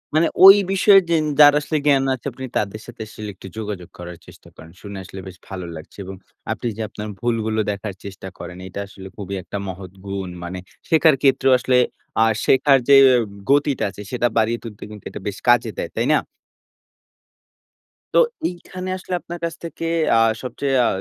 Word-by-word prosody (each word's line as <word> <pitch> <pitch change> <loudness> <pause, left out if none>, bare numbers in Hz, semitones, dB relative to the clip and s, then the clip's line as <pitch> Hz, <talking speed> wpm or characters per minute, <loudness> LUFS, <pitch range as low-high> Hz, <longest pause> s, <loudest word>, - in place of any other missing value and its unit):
মানে 160 +2 +4 0.2
ওই 195 +1 +12 0.2
বিষয়ে 195 +1 +6
যেন 160 -2 +3 0.2
যারা 145 0 +8
আসলে 155 +1 -1
জ্ঞান 140 -2 +4
আছে, 130 - -8 0.3
তাদের 105 +1 -2
সাথে 120 -1 -11
আসলে 105 0 -8
একটু 95 - -11
যোগাযোগ 105 -5 -5
করার 90 -1 -8
চেষ্টা - - -16
করেন। 80 +1 -13
শুনে 100 -1 -8
আসলে 95 +1 -10
বেশ 95 -1 -10
ভালো 95 -2 -6
লাগছে 80 +5 -12
এবং 95 +1 -7 0.4
আপনি - - -3
যে, - - -4
আপনার 105 +1 -7
ভুলগুলো 110 -2 -1
দেখার 100 0 -5
চেষ্টা 95 -1 -8
করেন, 90 - -8
এটা 95 - -7
আসলে 95 -1 -11
খুবই 100 -1 -5
একটা 95 +3 -6
মহৎ 95 -1 -7
গুণ। 95 -1 -4
মানে 90 +1 -5 0.3
শেখার 160 -2 +5
ক্ষেত্রেও 135 -1 +3
আসলে 125 0 +2 0.5
আ - - +5 0.2
শেখার 135 +1 +5
যে, 140 - +9 0.2
উ - - +1 0.3
গতিটা 145 -1 +2
আছে, 100 - -10
সেটা 120 -1 +1
বাড়িয়ে 115 +1 +2
তুলতে 110 -3 -9
কিন্তু 105 -2 -11
এটা - - -8
বেশ 100 0 -4
কাজে 120 -1 +4
দেয়। - - -3
তাই - - 0
না? - - +5 2.0
তো - - +7 0.3
এইখানে 185 +1 -8
আসলে 185 - -7
আপনার 175 0 -8
কাছ 165 - -4
থেকে 165 0 -6 0.3
আ - - +5 0.2
সবচেয়ে 135 +2 -2
আ - - +3
110 Hz, 185 wpm, -21 LUFS, 95-145 Hz, 2.0 s, ওই